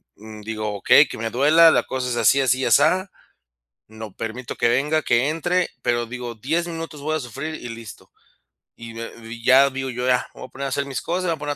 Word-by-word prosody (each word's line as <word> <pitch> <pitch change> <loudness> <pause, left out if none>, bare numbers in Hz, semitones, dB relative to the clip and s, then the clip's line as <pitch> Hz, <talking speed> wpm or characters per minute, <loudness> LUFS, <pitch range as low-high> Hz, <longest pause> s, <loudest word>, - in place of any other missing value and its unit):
Mm, 110 0 -12
digo: 110 0 -4
"Okey, 145 +9 +5
que - - -7
me 115 +1 -3
duela, 155 +7 +5
la - - +2
cosa 130 -1 -4
es 120 - -2
así, 120 +4 +4
así 130 -1 +2
y - - 0
asá". 160 - +3 0.8
No 110 -1 -10
permito 115 +4 -6
que - - +1
venga, 150 +6 +1
que 125 +1 +1
entre, 175 +3 -1
pero 120 0 0
digo: 120 0 -7
"10 160 +10 -2
minutos 165 -3 -7
voy 155 +2 -1
a - - -1
sufrir, 140 +5 -6
y 120 - -8
listo". 115 -2 -11 0.7
Y 115 0 -10
de 115 0 -7
y 115 +1 -9
ya. 130 +2 +6
Digo 135 0 -4
yo: 125 0 -4
"Ya, 125 -1 +1
me - - -11
voy - - -8
a - - -33
poner 140 +1 -5
a - - -2
hacer 140 +1 -2
mis 135 -1 -4
cosas, 180 +2 -2
me 175 - 0
voy 165 - -1
a - - -17
poner 145 0 -3
130 Hz, 245 wpm, -22 LUFS, 115-155 Hz, 0.8 s, ya